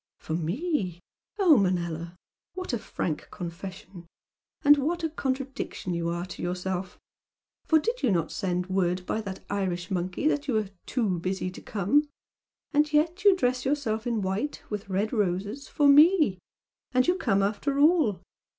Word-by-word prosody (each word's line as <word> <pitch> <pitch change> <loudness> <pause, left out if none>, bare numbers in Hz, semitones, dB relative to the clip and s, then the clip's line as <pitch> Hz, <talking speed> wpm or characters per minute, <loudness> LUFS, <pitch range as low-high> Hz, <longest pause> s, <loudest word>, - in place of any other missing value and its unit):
"For 160 - -6
me? 180 - -1 0.4
Oh, 360 -8 +6
Manella! 170 -3 -1 0.4
What 370 -7 -4
a 240 - 0
frank 160 -6 -4
confession! 180 0 -8 0.6
And 290 0 +7
what 335 +5 -1
a 325 - +1
contradiction 265 - -3
you 170 0 -1
are 170 +1 -2
to 185 - -9
yourself! 180 +1 -3 0.7
For 320 - +5
did 465 +11 -1
you 255 - +2
not 170 -5 +1
send 180 -3 -1
word 180 -1 0
by 220 - -1
that 195 -3 -7
Irish 185 -2 -2
monkey 185 +8 -1
that 290 -1 0
you 255 - 0
were 215 -2 0 0.2
'too 210 -9 0
busy 185 +1 -2
to - - -11
come'? 255 +10 +1 0.6
And 300 0 +3
yet 320 +5 +1
you 400 -2 +7
dress 250 -6 0
yourself 245 -6 -1
in 230 -4 0
white, 195 +10 -2
with 205 -1 -4
red 200 +4 -1
roses, 205 +5 -1
for 290 -2 +2
ME! 295 - +6 0.5
And 255 0 +4
you 355 - +5
come 200 - +1
after 220 +8 -1
all! 290 - +3
205 Hz, 160 wpm, -27 LUFS, 180-290 Hz, 0.7 s, And